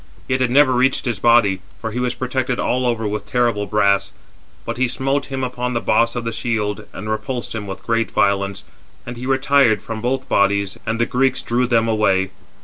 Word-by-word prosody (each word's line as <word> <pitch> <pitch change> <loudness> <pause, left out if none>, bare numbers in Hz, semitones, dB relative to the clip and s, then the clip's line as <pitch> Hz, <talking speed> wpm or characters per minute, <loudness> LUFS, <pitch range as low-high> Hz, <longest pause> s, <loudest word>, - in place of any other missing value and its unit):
Yet 130 -1 0
it 130 - +2
never 130 +1 +5
reached 130 +3 +2
his 120 -5 -2
body, 110 -5 +4 0.2
for 115 - -4
he 120 - -3
was 125 0 -1
protected 130 0 -2
all 125 0 0
over 115 -2 -1
with 105 0 -4
terrible 120 -4 0
brass; 100 -1 +2 0.5
but - - -4
he 130 0 +2
smote 135 +3 -1
him 135 -1 -4
upon 125 -1 -3
the - - +2
boss 115 +1 +2
of 120 -1 -3
the 115 - -1
shield, 110 -3 -2
and 105 - -8
repulsed 110 +3 -3
him 105 -2 -5
with 95 0 -8
great 115 0 0
violence; 100 -1 0 0.4
and 120 - -6
he 125 +2 -6
retired 135 -4 +3
from 110 -1 -6
both 130 +3 -1
bodies, 100 -1 +1
and 115 +1 -1
the 120 - +3
Greeks 130 +2 +1
drew 125 +1 0
them 115 -2 +2
away. 95 -4 +1
115 Hz, 205 wpm, -20 LUFS, 105-125 Hz, 0.5 s, never